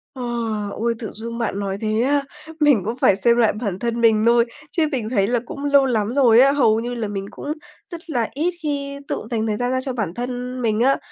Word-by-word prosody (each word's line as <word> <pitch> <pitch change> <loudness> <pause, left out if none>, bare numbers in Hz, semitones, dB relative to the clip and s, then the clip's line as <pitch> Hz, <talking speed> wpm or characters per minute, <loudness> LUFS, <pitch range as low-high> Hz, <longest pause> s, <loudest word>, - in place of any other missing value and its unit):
Ờ, 255 - -5 0.5
ôi! 235 +1 0
Tự 220 - -6
dưng 230 +2 -6
bạn 220 -4 -2
nói 195 -1 -3
thế 215 0 0
á 280 +2 +2 0.4
mình 290 -8 +4
cũng 230 +3 -3
phải 200 - +4
xem 235 +4 +3
lại 230 -3 +4
bản 205 -4 -4
thân 235 -1 -2
mình 220 -2 +4
thôi 235 0 +5 0.3
chứ 325 -3 +1
mình 240 -6 -2
thấy 200 -5 +2
là 240 +1 +1
cũng 280 +4 -6
lâu 280 -1 +5
lắm 225 -3 0
rồi 245 -4 +5
á, 270 +2 +6
hầu 225 -6 +3
như 240 +1 -4
là 230 -3 -3
mình 195 -1 -4
cũng 295 - -5 0.4
rất 340 0 -9
là 240 -7 0
ít 330 +6 0
khi 280 -1 -3
tự - - -3
dành 225 -1 0
thời 210 -1 -1
gian 245 +2 -1
ra 260 0 0
cho 260 0 -4
bản 215 -9 -3
thân 250 +2 -4
mình 220 -2 +1
á, 265 +3 +4
235 Hz, 245 wpm, -21 LUFS, 220-270 Hz, 0.5 s, á